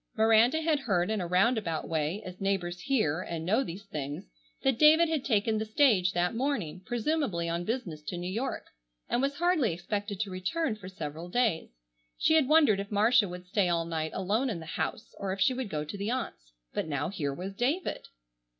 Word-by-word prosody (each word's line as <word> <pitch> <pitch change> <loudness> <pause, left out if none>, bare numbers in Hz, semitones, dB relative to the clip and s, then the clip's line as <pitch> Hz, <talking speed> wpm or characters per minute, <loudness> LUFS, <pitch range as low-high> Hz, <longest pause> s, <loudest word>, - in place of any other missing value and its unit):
Miranda 225 +7 +4
had 310 -2 +2
heard 195 -6 0
in 215 -3 0
a 175 - -3
round 195 +7 +3
about 165 -6 -3
way, 160 +5 -1
as 185 +1 -9
neighbors 180 -3 -1
hear 185 - +1
and 165 -3 -5
know 215 +9 +2
these 195 -3 -7
things, 145 -7 -5 0.4
that 265 -4 +2
David 315 +2 +7
had 310 -5 0
taken 215 -2 +1
the 220 - -2
stage 215 -6 +3
that 175 +2 +1
morning, 230 - -2
presumably 240 - -1
on 170 +1 -2
business 195 -10 -3
to 175 +4 -5
New 175 +1 -4
York, 235 +7 -3 0.4
and 240 - 0
was 275 +1 0
hardly 330 - +2
expected 200 +4 -4
to 205 -3 -3
return 215 - -1
for 195 -3 -10
several 165 -1 -6
days. 220 -6 +1 0.5
She - - +3
had 315 -5 +4
wondered 300 -10 +5
if 200 0 -4
Marcia 215 0 +4
would 180 0 -8
stay 185 0 +1
all 170 -1 +1
night 160 -1 -2
alone 210 +8 0
in 195 -7 -3
the 160 - -9
house - - -4
or 195 -1 -2
if 195 - -7
she 225 +7 +4
would 255 -4 -4
go 150 -3 -3
to 200 - -6
the 200 +2 -2
aunts. 225 - -4 0.2
But - - -2
now 145 0 -1
here 155 -8 -2
was 185 +7 -6
David! 275 - -1
200 Hz, 205 wpm, -29 LUFS, 175-245 Hz, 0.5 s, David